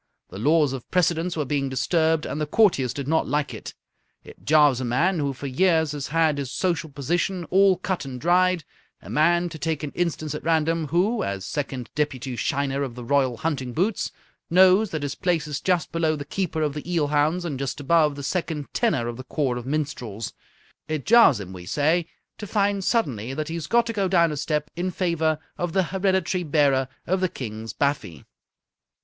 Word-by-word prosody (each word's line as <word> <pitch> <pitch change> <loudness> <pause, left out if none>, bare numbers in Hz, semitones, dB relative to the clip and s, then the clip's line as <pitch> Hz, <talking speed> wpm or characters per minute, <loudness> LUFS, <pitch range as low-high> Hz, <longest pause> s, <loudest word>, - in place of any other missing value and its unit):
The 95 - -8
laws 150 +2 +3
of 130 -3 -7
precedence 170 -1 +1
were 150 - 0
being 140 -1 -1
disturbed, 160 +3 +1
and 150 - -4
the 150 - -1
courtiers 150 - +3
did 135 +2 -5
not 160 +2 +1
like 150 -1 -1
it. - - -8 0.5
It - - -15
jars 150 -4 +4
a - - -2
man 160 +10 +1
who 140 -2 0
for 135 +1 -8
years 160 +2 +2
has 145 -2 -4
had 160 -1 +2
his 135 -3 -4
social 170 -4 -1
position 170 +6 -1
all 195 -1 +5
cut 185 0 -2
and 130 -2 -7
dried 180 +2 +3 0.4
a - - -9
man, 175 +3 +3
to 160 -1 -9
take 160 -1 -2
an 145 - -4
instance 160 -3 -2
at 150 - -6
random, 165 0 +1
who, 185 - +1
as 100 -1 -3
Second 135 -6 -4
Deputy 135 -4 -2
Shiner 140 +2 -1
of 130 -4 -3
the 125 - -7
Royal 130 -1 +1
Hunting 135 -5 -2
Boots, 190 - 0 0.4
knows 190 +4 +5
that 155 -3 -4
his 145 0 -2
place 175 -5 0
is 145 -1 -4
just 180 -3 0
below 160 -1 +1
the 145 -1 -6
Keeper 160 -1 -2
of 150 -2 0
the 150 +4 -6
Eel 155 -4 +1
Hounds 150 +4 +1
and 145 -6 -3
just 140 0 -3
above 150 0 +3
the 140 - -7
Second 160 -3 -3
Tenor 120 -2 +1
of 120 -1 -5
the 130 - -7
Corps 130 -3 -1
of 120 0 -7
Minstrels 130 -8 -3 0.5
it 155 -3 -3
jars 230 - +6
him, 95 -2 -8
we 90 -1 -10
say, 160 - +1 0.3
to 210 - -6
find 200 -1 +1
suddenly 135 - 0
that 155 +1 -3
he - - -4
has 165 -2 -4
got 235 0 +3
to 230 - -3
go 200 -3 0
down 170 -3 +3
a 150 - -4
step 150 0 -2
in 180 +2 -1
favour 165 -4 0 0.2
of 175 -2 -2
the 190 - +3
Hereditary 190 -1 0
Bearer 140 -4 +2 0.2
of 185 +1 0
the 185 - +2
King's 110 -5 -6
Baffy. 135 - -2
155 Hz, 205 wpm, -24 LUFS, 140-175 Hz, 0.5 s, jars